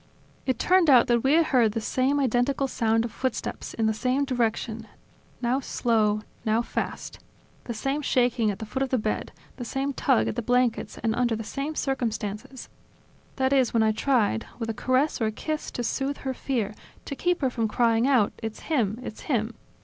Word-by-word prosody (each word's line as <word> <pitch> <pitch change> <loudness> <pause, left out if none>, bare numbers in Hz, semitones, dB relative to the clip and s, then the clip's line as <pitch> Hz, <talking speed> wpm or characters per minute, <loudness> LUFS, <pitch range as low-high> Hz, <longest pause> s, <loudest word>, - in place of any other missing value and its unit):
It 260 -3 +1
turned 360 +3 +4
out 255 -4 +7
that 240 -2 +2
we 270 +2 +3
had 330 +1 +5
heard 240 -8 +3
the 225 - -1
same 260 +5 +1
identical 265 +1 +1
sound 225 -2 +1
of 235 - -5
footsteps, 260 +2 -4
in 225 - 0
the 220 - +2
same 255 +6 0
direction, 230 -3 -1 0.6
now 245 +3 +2
slow, 215 -5 +1 0.2
now 225 +1 +2
fast; - - -4 0.5
the 240 - -3
same 270 +6 -1
shaking 245 -4 +2
at 200 - -2
the 220 - -6
foot 240 +5 -4
of 270 - 0
the 255 - +2
bed, 215 -1 -2 0.3
the 250 - -5
same 270 +3 -2
tug 265 -2 +2
at - - -2
the 240 - -1
blankets 245 -3 +1
and 225 -1 +2
under 240 -1 +1
the 225 - -5
same 280 +7 -4
circumstances, 245 -1 -3 0.7
that 265 0 +1
is 260 -4 +2
when 225 - +4
I 220 - +3
tried, 215 - +1
with 225 -2 -2
a - - -5
caress, 255 +5 +1
or 220 - +2
a - - -1
kiss, 310 +7 -4
to 245 - -4
soothe 270 +4 -1
her 265 - 0
fear, 235 -6 -2 0.3
to 280 - -5
keep 355 +3 0
her 260 -2 +1
from 230 -2 0
crying 230 +2 +2
out: 250 -7 +3
"It's 220 -1 -5
him! 230 -9 0
It's 220 - -7
him!" 235 -3 0
245 Hz, 200 wpm, -26 LUFS, 220-270 Hz, 0.7 s, out